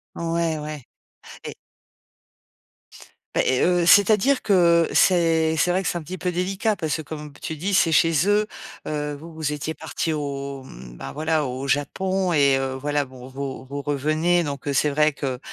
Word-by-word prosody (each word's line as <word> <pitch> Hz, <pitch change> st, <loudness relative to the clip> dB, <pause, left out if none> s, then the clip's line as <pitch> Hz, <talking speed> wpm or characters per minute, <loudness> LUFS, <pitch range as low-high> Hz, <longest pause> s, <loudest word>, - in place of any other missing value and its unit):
Ouais 165 Hz, -1 st, -1 dB
ouais. 150 Hz, -1 st, -6 dB, 0.6 s
Et -, -, -6 dB, 1.8 s
Beh -, -, +3 dB
et 130 Hz, -, +2 dB
heu, 175 Hz, -1 st, +3 dB
c'est-à-dire 210 Hz, +8 st, +5 dB
que 170 Hz, -4 st, +4 dB
c'est 165 Hz, -3 st, +3 dB
c'est 180 Hz, -, +2 dB
vrai 185 Hz, +2 st, +1 dB
que 180 Hz, -, -1 dB
c'est 175 Hz, -, -1 dB
un -, -, -8 dB
petit 180 Hz, +5 st, -7 dB
peu 180 Hz, 0 st, -2 dB
délicat. 190 Hz, +4 st, -1 dB
Parce 160 Hz, -4 st, -2 dB
que 160 Hz, -, -5 dB
comme 150 Hz, 0 st, -8 dB
p 145 Hz, -, -19 dB
tu 160 Hz, -, -5 dB
dis, 190 Hz, +6 st, -2 dB
c'est 165 Hz, -3 st, +3 dB
chez 165 Hz, +1 st, +3 dB
eux, 210 Hz, +1 st, +3 dB, 0.4 s
heu, 150 Hz, -1 st, -3 dB
vous 160 Hz, +3 st, -12 dB
vous 155 Hz, -2 st, -2 dB
étiez 150 Hz, +2 st, -4 dB
partis 160 Hz, +1 st, -3 dB
au 140 Hz, -2 st, -4 dB
mmh, -, -, -12 dB
bah, -, -, -7 dB
voilà 155 Hz, +1 st, 0 dB
au 130 Hz, +1 st, -4 dB
Japon 185 Hz, +6 st, 0 dB
et 140 Hz, -3 st, +4 dB
heu, 135 Hz, 0 st, -2 dB
voilà 145 Hz, +2 st, -1 dB
bon 130 Hz, -1 st, -12 dB
vous 135 Hz, 0 st, -6 dB
vous 140 Hz, +2 st, -5 dB
revenez 155 Hz, +5 st, +1 dB
donc 140 Hz, -1 st, -6 dB
heu, -, -, 0 dB
c'est 140 Hz, +2 st, +2 dB
vrai 150 Hz, +2 st, +2 dB
que, 135 Hz, -3 st, -4 dB
155 Hz, 190 wpm, -23 LUFS, 140-175 Hz, 1.8 s, c'est-à-dire